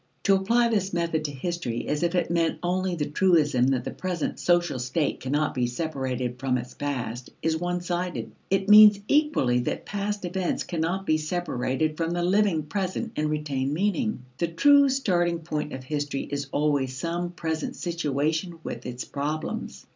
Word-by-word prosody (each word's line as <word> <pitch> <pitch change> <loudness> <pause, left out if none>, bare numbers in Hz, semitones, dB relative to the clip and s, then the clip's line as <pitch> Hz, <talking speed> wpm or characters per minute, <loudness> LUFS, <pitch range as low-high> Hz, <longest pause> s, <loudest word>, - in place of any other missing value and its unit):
To 195 - +4
apply 230 +5 +3
this 200 -4 0
method 165 -2 0
to 145 - -2
history 140 -4 -3
as 150 - -1
if 170 +1 +1
it 175 - +1
meant 165 -1 +1
only 185 +1 0
the 150 -3 -1
truism 150 -6 +3
that 135 -2 +1
the - - -4
present 180 -4 -3
social 175 -6 +2
state 130 +5 -1
cannot 145 +3 0
be 125 -2 0
separated 130 -3 -3
from 130 -1 +1
its 125 0 -6
past, 125 -4 -4
is 160 0 +2
one 175 +2 -2
sided. 175 0 -3 0.2
It 195 0 +1
means 210 -1 +9
equally 285 - +3
that 120 - -3
past 205 -1 -3
events 180 0 -1
cannot 175 +3 -2
be 155 -3 +2
separated 155 -2 -1
from 165 0 -1
the 175 0 -1
living 185 -3 +2
present 190 +7 -3
and 150 0 0
retain 145 -3 -1
meaning. 210 - 0 0.2
The 170 - +1
true 280 - +5
starting 175 -10 +1
point 155 -2 -4
of 130 0 -6
history 145 0 -2
is 140 -1 -2
always 145 -3 0
some 175 +3 -2
present 160 -3 -3
situation 160 +1 -1
with 120 - -6
its 125 0 -5
problems. 150 +2 -4
165 Hz, 170 wpm, -26 LUFS, 140-180 Hz, 0.2 s, means